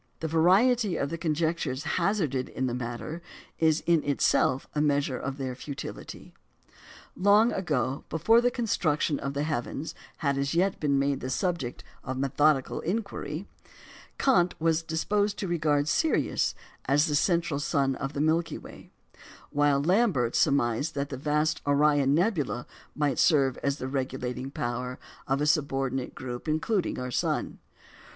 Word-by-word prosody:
The 160 Hz, -, -2 dB
variety 190 Hz, +7 st, +3 dB
of 140 Hz, -, -2 dB
the 165 Hz, -, -3 dB
conjectures 160 Hz, -4 st, -1 dB
hazarded 165 Hz, -7 st, 0 dB
in 130 Hz, -, -2 dB
the 125 Hz, -, -1 dB
matter 125 Hz, +7 st, -5 dB, 0.4 s
is 160 Hz, -1 st, +3 dB
in 170 Hz, -3 st, +3 dB
itself 135 Hz, -2 st, +2 dB
a 150 Hz, -, 0 dB
measure 145 Hz, -3 st, +1 dB
of 135 Hz, 0 st, -4 dB
their 130 Hz, -2 st, -3 dB
futility. 135 Hz, +2 st, -8 dB, 0.8 s
Long 205 Hz, +5 st, +4 dB
ago, 140 Hz, -7 st, -1 dB
before 225 Hz, +9 st, +4 dB
the 245 Hz, -, +3 dB
construction 160 Hz, -, 0 dB
of 135 Hz, 0 st, -4 dB
the 145 Hz, -, 0 dB
heavens 150 Hz, 0 st, -3 dB, 0.2 s
had 140 Hz, -3 st, 0 dB
as 140 Hz, +3 st, -1 dB
yet 185 Hz, +3 st, +1 dB
been 140 Hz, -2 st, +1 dB
made 140 Hz, 0 st, +1 dB
the 130 Hz, -, -5 dB
subject 165 Hz, -4 st, -2 dB, 0.2 s
of 130 Hz, +1 st, -4 dB
methodical 140 Hz, +1 st, +2 dB
inquiry, 185 Hz, -3 st, -3 dB, 0.7 s
Kant 180 Hz, -10 st, +3 dB
was 165 Hz, 0 st, +2 dB
disposed 200 Hz, +6 st, 0 dB
to 195 Hz, -, -3 dB
regard 150 Hz, -4 st, +1 dB
Sirius 320 Hz, -, +1 dB, 0.3 s
as 145 Hz, +3 st, +3 dB
the 150 Hz, -, -2 dB
"central 165 Hz, -1 st, +1 dB
sun" 140 Hz, -2 st, +1 dB
of 135 Hz, +1 st, -4 dB
the 145 Hz, -, -2 dB
Milky 165 Hz, +2 st, +1 dB
Way; -, -, -13 dB, 0.6 s
while 145 Hz, -1 st, +3 dB
Lambert 175 Hz, -, +2 dB
surmised 140 Hz, +1 st, +1 dB
that 140 Hz, 0 st, -2 dB
the 135 Hz, -, -4 dB
vast 150 Hz, +2 st, 0 dB
Orion 145 Hz, -1 st, +3 dB
nebula 160 Hz, -, 0 dB, 0.3 s
might 145 Hz, -2 st, 0 dB
serve 135 Hz, -6 st, +4 dB
as 140 Hz, 0 st, -1 dB
the 130 Hz, -, -4 dB
regulating 130 Hz, -1 st, -3 dB
power 125 Hz, -1 st, -3 dB, 0.3 s
of 135 Hz, +2 st, 0 dB
a -, -, +2 dB
subordinate 135 Hz, -3 st, 0 dB
group 125 Hz, +2 st, -6 dB
including 165 Hz, +5 st, 0 dB
our 125 Hz, 0 st, -4 dB
sun. -, -, -1 dB
150 Hz, 150 wpm, -28 LUFS, 135-170 Hz, 0.8 s, Long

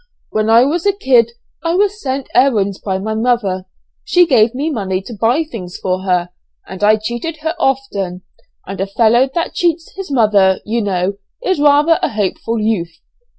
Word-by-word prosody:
"When 215 Hz, 0 st, 0 dB
I 230 Hz, +2 st, +6 dB
was 320 Hz, +7 st, 0 dB
a 400 Hz, -, +3 dB
kid; 245 Hz, -, +2 dB, 0.3 s
I 335 Hz, +1 st, 0 dB
was 410 Hz, +2 st, +1 dB
sent 265 Hz, 0 st, -3 dB
errands 210 Hz, -7 st, +2 dB
by 190 Hz, -2 st, -2 dB
my 215 Hz, +3 st, -3 dB
mother, 220 Hz, -5 st, 0 dB, 0.4 s
she 355 Hz, 0 st, +4 dB
gave 240 Hz, -6 st, +3 dB
me 295 Hz, +5 st, -1 dB
money 190 Hz, -7 st, -2 dB
to 235 Hz, -, -9 dB
buy 235 Hz, +8 st, +1 dB
things 195 Hz, -, -8 dB
for 185 Hz, 0 st, -2 dB
her, 180 Hz, -2 st, 0 dB, 0.4 s
and 190 Hz, +2 st, -7 dB
I 215 Hz, +1 st, +6 dB
cheated 240 Hz, +9 st, -4 dB
her 320 Hz, 0 st, -1 dB
often, 205 Hz, -, -1 dB, 0.4 s
and 195 Hz, 0 st, -6 dB
a 195 Hz, -, -1 dB
fellow 235 Hz, +5 st, +3 dB
that 335 Hz, -, -1 dB
cheats 335 Hz, -1 st, -1 dB
his 390 Hz, -1 st, -7 dB
mother, 210 Hz, -7 st, +3 dB
you 230 Hz, +2 st, -1 dB
know, 195 Hz, -1 st, -1 dB, 0.3 s
is 375 Hz, -8 st, 0 dB
rather 295 Hz, +3 st, +4 dB
a -, -, +1 dB
hopeful 215 Hz, +2 st, -2 dB
youth. 180 Hz, -7 st, -1 dB
230 Hz, 180 wpm, -16 LUFS, 195-285 Hz, 0.4 s, I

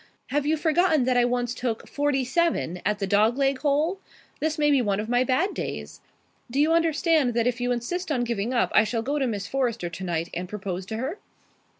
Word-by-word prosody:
Have 290 Hz, +1 st, 0 dB
you 315 Hz, +1 st, +2 dB
forgotten 320 Hz, -1 st, +3 dB
that 255 Hz, 0 st, +1 dB
I 245 Hz, 0 st, +4 dB
once 245 Hz, 0 st, -1 dB
took 235 Hz, -3 st, -3 dB
forty 285 Hz, -2 st, 0 dB
seven 255 Hz, -, 0 dB
at 210 Hz, 0 st, 0 dB
the 200 Hz, -, -2 dB
dog 210 Hz, +5 st, +3 dB
leg 275 Hz, -1 st, +1 dB
hole? 300 Hz, +7 st, +1 dB, 0.4 s
This 315 Hz, +1 st, -1 dB
may 295 Hz, -1 st, +3 dB
be 275 Hz, -2 st, +4 dB
one 200 Hz, -3 st, 0 dB
of 215 Hz, -, -3 dB
my 245 Hz, +1 st, +3 dB
bad 275 Hz, +10 st, +1 dB
days. -, -, -6 dB, 0.5 s
Do 265 Hz, +4 st, -1 dB
you 310 Hz, +3 st, +4 dB
understand 320 Hz, -5 st, +2 dB
that 235 Hz, -1 st, +2 dB
if 245 Hz, 0 st, 0 dB
you 245 Hz, 0 st, 0 dB
insist 320 Hz, +10 st, -2 dB
on 250 Hz, -4 st, +1 dB
giving 235 Hz, -1 st, -2 dB
up 245 Hz, -, +1 dB
I 215 Hz, -, +6 dB
shall 225 Hz, +1 st, -2 dB
go 285 Hz, +4 st, -1 dB
to 265 Hz, -, +1 dB
Miss 205 Hz, -4 st, -3 dB
Forrester 235 Hz, -8 st, -1 dB
tonight 170 Hz, -1 st, -3 dB
and 180 Hz, +1 st, -4 dB
propose 190 Hz, -3 st, -5 dB
to 220 Hz, -, -4 dB
her?" 275 Hz, -, -4 dB
250 Hz, 220 wpm, -25 LUFS, 220-295 Hz, 0.5 s, I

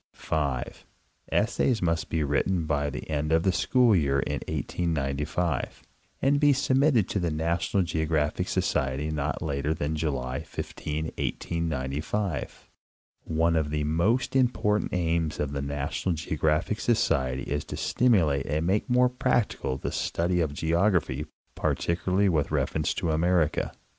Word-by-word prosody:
5. 70 Hz, -5 st, -3 dB, 0.4 s
ESSAYS 115 Hz, +2 st, +2 dB
MUST 85 Hz, -1 st, 0 dB
BE 80 Hz, -2 st, 0 dB
WRITTEN 80 Hz, +4 st, 0 dB
BY 75 Hz, -1 st, 0 dB
THE 65 Hz, -2 st, -6 dB
END 75 Hz, 0 st, -1 dB
OF 80 Hz, +1 st, +3 dB
THE 95 Hz, -, +3 dB
SCHOOL 120 Hz, +4 st, +3 dB
YEAR 70 Hz, -5 st, +2 dB
IN -, -, -2 dB
1895, 75 Hz, -1 st, -2 dB, 0.4 s
AND 140 Hz, +1 st, +3 dB
BE 145 Hz, -1 st, +5 dB
SUBMITTED 130 Hz, -4 st, +3 dB
TO 100 Hz, -, -1 dB
THE 85 Hz, -2 st, 0 dB
NATIONAL 85 Hz, +5 st, 0 dB
GEOGRAPHIC 80 Hz, -3 st, 0 dB
So -, -, +1 dB
CIETY 65 Hz, +3 st, -1 dB
NOT 75 Hz, +2 st, -2 dB
LATER 75 Hz, 0 st, -1 dB
THAN 75 Hz, +1 st, -2 dB
JULY 70 Hz, -3 st, -2 dB
15, 75 Hz, 0 st, -5 dB, 0.2 s
1895. 80 Hz, +2 st, -3 dB, 0.6 s
One 80 Hz, +1 st, +1 dB
of 80 Hz, -2 st, +1 dB
the 75 Hz, 0 st, -1 dB
most 90 Hz, -, +1 dB
important 120 Hz, -5 st, +2 dB
aims 85 Hz, -3 st, 0 dB
of 75 Hz, -2 st, -1 dB
the 70 Hz, -1 st, -3 dB
NATIONAL 70 Hz, +5 st, -2 dB
GEOGRAPHIC 80 Hz, +5 st, 0 dB
Socrery 65 Hz, -, +1 dB
is 75 Hz, 0 st, -2 dB
to -, -, -6 dB
stimulate 85 Hz, -, +2 dB
and 75 Hz, +3 st, 0 dB
make 100 Hz, +7 st, 0 dB
more 125 Hz, 0 st, +5 dB
practical 120 Hz, -, 0 dB
the -, -, -4 dB
study 90 Hz, +1 st, 0 dB
of 80 Hz, -3 st, 0 dB
geography, 80 Hz, -2 st, +1 dB, 0.3 s
particularly 90 Hz, +4 st, 0 dB
with 80 Hz, -6 st, +1 dB
reference 75 Hz, -2 st, 0 dB
to 80 Hz, -, -1 dB
America. 80 Hz, 0 st, +1 dB
80 Hz, 140 wpm, -27 LUFS, 75-95 Hz, 0.6 s, BE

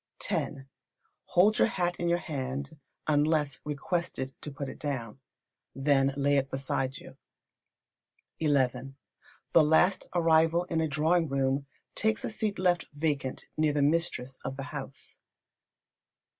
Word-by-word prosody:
x. -, -, 0 dB, 0.7 s
Hold 205 Hz, +5 st, +4 dB
your -, -, +6 dB
hat 175 Hz, -1 st, -1 dB
in 175 Hz, -, 0 dB
your 170 Hz, -, +3 dB
hand, 140 Hz, -1 st, -5 dB, 0.3 s
unless 150 Hz, -2 st, +2 dB
requested 150 Hz, -2 st, -3 dB
to -, -, -4 dB
put 140 Hz, 0 st, -5 dB
it -, -, -8 dB
down. 130 Hz, -5 st, -4 dB, 0.6 s
Then 135 Hz, 0 st, +3 dB
lay 140 Hz, 0 st, +3 dB
it 135 Hz, 0 st, 0 dB
beside 135 Hz, -1 st, -2 dB
you. -, -, -12 dB, 1.2 s
xi. 160 Hz, -, +2 dB
The 135 Hz, +3 st, 0 dB
last 160 Hz, +5 st, +3 dB
arrival 165 Hz, 0 st, +4 dB
in 165 Hz, -2 st, -1 dB
a 160 Hz, -, +1 dB
drawing 160 Hz, +3 st, +2 dB
room 135 Hz, +1 st, 0 dB, 0.3 s
takes 220 Hz, 0 st, +1 dB
a -, -, -3 dB
seat 215 Hz, -2 st, -2 dB
left 180 Hz, -2 st, +1 dB
vacant 145 Hz, -4 st, -2 dB
near 155 Hz, -1 st, +2 dB
the 145 Hz, -1 st, +2 dB
mistress 140 Hz, -4 st, 0 dB
of 135 Hz, 0 st, -4 dB
the 135 Hz, -, -4 dB
house. 135 Hz, -2 st, -7 dB
145 Hz, 135 wpm, -29 LUFS, 135-165 Hz, 1.2 s, your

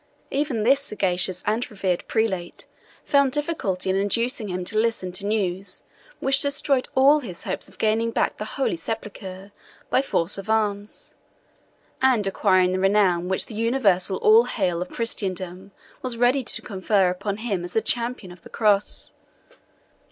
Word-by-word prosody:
Even 275 Hz, -6 st, -1 dB
this 270 Hz, +5 st, +5 dB
sagacious 185 Hz, -8 st, -1 dB
and 220 Hz, +4 st, 0 dB
reverend 190 Hz, -4 st, -2 dB
prelate 190 Hz, -6 st, -2 dB, 0.4 s
found 280 Hz, -2 st, +3 dB
difficulty 285 Hz, -, -2 dB
in 190 Hz, -, +2 dB
inducing 230 Hz, +4 st, 0 dB
him 180 Hz, -1 st, -4 dB
to 215 Hz, -, -3 dB
listen 220 Hz, -5 st, 0 dB
to 190 Hz, +3 st, -3 dB
news 195 Hz, -3 st, -1 dB, 0.4 s
which 275 Hz, 0 st, +2 dB
destroyed 280 Hz, -2 st, +1 dB
all 280 Hz, +3 st, +6 dB
his 185 Hz, -11 st, -7 dB
hopes -, -, -4 dB
of -, -, -20 dB
gaining 225 Hz, +1 st, +1 dB
back 230 Hz, -, 0 dB
the 210 Hz, -, -4 dB
Holy 265 Hz, -2 st, -1 dB
Sepulchre 195 Hz, 0 st, -6 dB, 0.4 s
by -, -, +4 dB
force 195 Hz, -8 st, 0 dB
of 195 Hz, +2 st, -9 dB
arms, 210 Hz, -2 st, -1 dB, 0.9 s
and 255 Hz, -6 st, +3 dB
acquiring 185 Hz, -2 st, +3 dB
the 185 Hz, -, -1 dB
renown 190 Hz, -3 st, +3 dB
which 190 Hz, 0 st, +1 dB
the -, -, -9 dB
universal 210 Hz, -5 st, +1 dB
all 440 Hz, +2 st, +6 dB
hail 180 Hz, -5 st, -1 dB
of 180 Hz, -, -4 dB
Christendom 190 Hz, -4 st, -2 dB, 0.3 s
was 250 Hz, -2 st, -3 dB
ready 245 Hz, +3 st, +3 dB
to -, -, -2 dB
confer 190 Hz, -1 st, +1 dB
upon 200 Hz, +2 st, -3 dB
him 210 Hz, -6 st, -2 dB
as 175 Hz, -, -6 dB
the -, -, +3 dB
Champion 235 Hz, -5 st, -2 dB
of 175 Hz, -1 st, -14 dB
the -, -, -14 dB
Cross. 210 Hz, -2 st, +1 dB
210 Hz, 160 wpm, -24 LUFS, 185-240 Hz, 0.9 s, all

